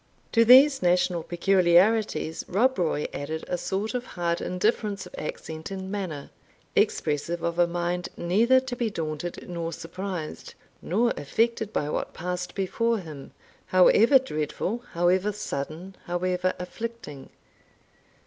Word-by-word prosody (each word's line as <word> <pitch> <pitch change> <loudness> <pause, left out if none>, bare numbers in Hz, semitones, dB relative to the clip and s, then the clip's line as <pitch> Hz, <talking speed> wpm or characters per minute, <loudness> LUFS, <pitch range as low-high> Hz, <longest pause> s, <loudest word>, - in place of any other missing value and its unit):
To 230 - +5
these 265 +4 +7
national 180 -1 +2
peculiarities 180 +1 +2
Rob 245 +5 +2
Roy 160 -3 0
added 155 +3 -4
a 180 - -1
sort 195 +5 -2
of 250 -1 -2
hard 170 -1 0
indifference 200 +2 -1
of - - -13
accent 155 +1 -6
and 190 -1 -6
manner, 180 -9 -5 0.4
expressive 160 +3 0
of 170 0 -2
a 175 - +5
mind 175 +1 -2
neither 225 +9 +4
to 260 -1 -5
be 240 -2 -1
daunted, 165 -2 -5
nor 170 -1 -4
surprised, 175 0 -6 0.3
nor 230 +7 +1
affected 220 +8 0
by 145 - -1
what - - -3
passed 180 +1 -4
before 230 +4 0
him, 155 -8 -9 0.4
however 215 +8 +6
dreadful, 200 - -3
however 180 +4 +2
sudden, 180 -1 -5
however 180 +1 -1
afflicting. 180 -6 -7
180 Hz, 130 wpm, -26 LUFS, 170-215 Hz, 0.4 s, these